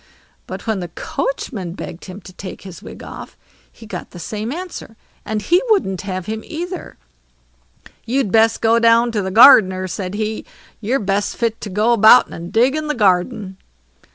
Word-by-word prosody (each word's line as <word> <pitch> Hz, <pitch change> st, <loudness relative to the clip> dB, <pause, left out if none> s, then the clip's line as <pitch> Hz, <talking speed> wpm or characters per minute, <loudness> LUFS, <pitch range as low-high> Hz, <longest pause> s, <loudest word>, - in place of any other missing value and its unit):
But -, -, -7 dB
when 220 Hz, -4 st, -1 dB
the 175 Hz, -, -5 dB
coachman 195 Hz, -, -4 dB
begged 175 Hz, -1 st, -8 dB
him 195 Hz, +2 st, -9 dB
to 185 Hz, 0 st, -13 dB
take 185 Hz, +1 st, -9 dB
his 190 Hz, -3 st, -10 dB
wig -, -, -11 dB
off, -, -, -10 dB, 0.3 s
he 225 Hz, -, -15 dB
got -, -, -7 dB
the -, -, -12 dB
same 215 Hz, +6 st, -5 dB
answer, 330 Hz, -9 st, -7 dB, 0.3 s
and 215 Hz, -1 st, -3 dB
he 350 Hz, -, +3 dB
wouldn't 195 Hz, -, +1 dB
have 185 Hz, -2 st, -5 dB
him 220 Hz, +2 st, -4 dB
either. 350 Hz, +2 st, -7 dB, 1.1 s
"You'd 250 Hz, -4 st, 0 dB
best 225 Hz, +1 st, +3 dB
go 230 Hz, +1 st, +4 dB
down 230 Hz, +1 st, +4 dB
to 215 Hz, -2 st, -1 dB
the 190 Hz, -, -3 dB
gardener", 190 Hz, -4 st, +7 dB
said 185 Hz, +2 st, -5 dB
he; 215 Hz, 0 st, -3 dB, 0.4 s
"you're 230 Hz, +5 st, 0 dB
best 200 Hz, 0 st, -1 dB
fit 230 Hz, -2 st, -1 dB
to 210 Hz, -, -6 dB
go 210 Hz, +5 st, +2 dB
about 225 Hz, +2 st, +7 dB
and 170 Hz, +1 st, -8 dB
dig 250 Hz, +5 st, +3 dB
in 310 Hz, 0 st, -3 dB
the 300 Hz, -, -1 dB
garden." 190 Hz, 0 st, 0 dB
215 Hz, 180 wpm, -19 LUFS, 190-235 Hz, 1.1 s, gardener